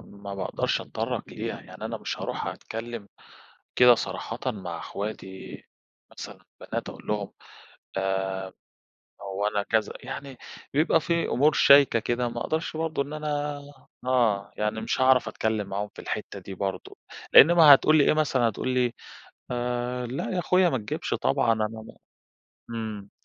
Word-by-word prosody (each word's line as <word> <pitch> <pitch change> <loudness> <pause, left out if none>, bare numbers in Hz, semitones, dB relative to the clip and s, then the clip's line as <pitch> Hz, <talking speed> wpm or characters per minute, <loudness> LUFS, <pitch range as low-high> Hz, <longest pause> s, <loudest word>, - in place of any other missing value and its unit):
ما 100 0 -9
باقدَرش 95 - -1
أتطرّق - - -3
ليها، - - -5
يعني - - -11
أنا - - -3
مش - - -4
هارُوح - - -4
أتكلّم 115 -2 -6 0.7
كده 125 -1 +8
صراحةً 110 +3 -4
مع 90 -6 -6
أخواتي 95 -2 -7 0.5
مثلًا - - -10 0.2
بنات - - -4
أقول - - -12
لهم 105 -2 -2 0.7
آآ، 95 0 -2 0.7
هو 100 +1 -2
أنا 105 -1 0
كذا، 110 +1 0
يعني 135 0 -7 0.4
بيبقى 160 +2 +3
في 170 +1 0
أمور 150 +5 +3
شايكة 140 -5 +6
كده 120 +2 -1
ما 120 0 -5
أقدَرش 160 0 -2
برضه 160 -2 -1
إن 145 - -9
أنا 150 -1 -2 0.5
آه 115 -6 +2
يعني 105 +1 -1
مش - - -1
هاعرف 130 -1 +5
أتكلّم 110 -2 -1
معاهم 100 +1 -3
في - - -8
الحِتّة - - -5
دي 95 - -9
برضه 95 0 -4 0.4
لإن 160 - +10
ما 155 -4 +9
هتقول 155 +3 +5
لي 145 - +6
إيه - - +4
مثلًا 135 -6 +2
هتقول 120 +4 -4
لي 125 -2 +1 1.1
لا 130 +4 -3
يا 180 - 0
أخويا 180 0 +3
ما 130 - 0
تجيبش 105 -2 -4
طبعًا 115 - +2
أنا 110 -1 0
م 110 0 -10 0.8
امم. 110 -3 -5
115 Hz, 150 wpm, -26 LUFS, 100-140 Hz, 1.1 s, لإن